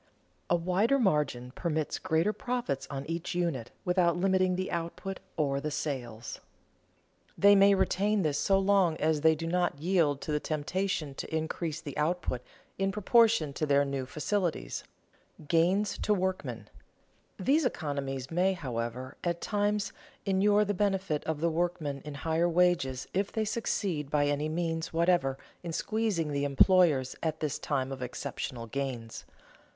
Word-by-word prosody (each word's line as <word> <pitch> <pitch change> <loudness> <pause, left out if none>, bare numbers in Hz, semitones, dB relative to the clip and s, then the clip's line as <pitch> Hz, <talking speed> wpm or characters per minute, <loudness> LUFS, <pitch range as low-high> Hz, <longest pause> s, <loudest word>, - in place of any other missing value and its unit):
A 175 - +4
wider 185 +9 +2
margin 150 - +1
permits 155 0 -2
greater 165 +7 +1
profits 240 - -3
on 135 -1 -5
each 165 +2 -4
unit 165 -10 -1 0.2
without 180 -1 +3
limiting 185 0 +2
the 185 +1 -3
output 170 +3 -4 0.2
or 140 -3 +1
the 150 - -2
sales. 125 -6 -4 1.0
They 200 0 +7
may 200 0 +6
retain 205 +1 +1
this 150 -2 0
so 195 - +3
long 195 -4 +3
as 155 -1 +1
they 160 0 +5
do 165 +2 -5
not 175 -2 0
yield 160 -3 +2
to 165 - -4
the 150 - +1
temptation 155 0 -2
to - - -7
increase 160 0 -2
the 145 -4 -7
output 150 -5 0 0.4
in 195 0 +1
proportion 215 - +3
to 155 +2 -2
their 140 0 +4
new 135 -2 -3
facilities. 175 +4 -2 0.5
[Sidenote: 150 - -16
Gains 190 +5 +2
to 210 - +2
workmen] 185 0 -3 0.7
These 300 +4 +2
economies, 140 - -3
may, 185 +3 +2
however, 125 -5 -4
at 170 -1 -1
times 205 +1 0 0.3
inure 205 +1 +3
to - - +3
the 205 - 0
benefit 195 -6 0
of 160 -2 -2
the 170 0 +2
workmen 160 -4 -1
in 150 -1 -7
higher 160 +3 +1
wages 170 -7 +2
if 195 +2 0
they 220 -1 -1
succeed 190 -9 -1
by 145 -1 +2
any 145 +1 0
means 165 0 -2
whatever 165 -5 +2 0.2
in 170 - -5
squeezing 200 -4 -1
the 140 0 -1
employers 145 -2 +4
at 160 -1 -2
this 150 -3 -2
time 135 -2 -1
of 135 -1 -6
exceptional 125 -1 -5
gains. 120 -2 -5
165 Hz, 155 wpm, -30 LUFS, 145-190 Hz, 1.0 s, They